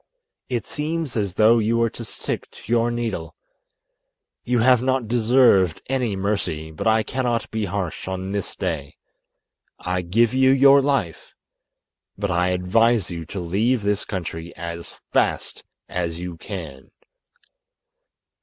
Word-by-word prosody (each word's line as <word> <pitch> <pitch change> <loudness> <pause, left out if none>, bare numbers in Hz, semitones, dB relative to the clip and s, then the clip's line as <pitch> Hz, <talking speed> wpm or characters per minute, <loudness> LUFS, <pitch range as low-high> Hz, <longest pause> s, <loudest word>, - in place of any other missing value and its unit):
It 120 -3 -2
seems 155 -1 -3
as 100 -5 -1
though 110 +3 +5
you 115 +2 +1
were 115 0 +2
to 120 - -8
stick - - -5
to - - -15
your 120 0 +3
needle. 120 -1 -3 1.1
You 125 0 +1
have 125 +1 +5
not 130 -2 0
deserved 115 -7 +4
any 125 -6 0
mercy, 90 -6 -2
but 80 - -4
I 110 0 +4
cannot 120 -2 -2
be 110 -1 -1
harsh 95 -3 -4
on 95 0 -4
this 100 -2 -3
day. 70 -3 -3 0.8
I 90 0 -2
give 110 +7 +2
you 130 0 +4
your 135 +1 +7
life, 135 - -2 0.8
but 100 -1 -2
I 90 0 +2
advise 95 +4 +2
you 85 -1 -5
to 100 - -5
leave 105 +7 0
this 100 0 0
country 85 -3 -5
as 85 0 -6 0.2
fast - - 0 0.2
as 85 -2 -3
you 90 -1 -5
can." 80 -7 -8
105 Hz, 140 wpm, -23 LUFS, 90-120 Hz, 1.1 s, your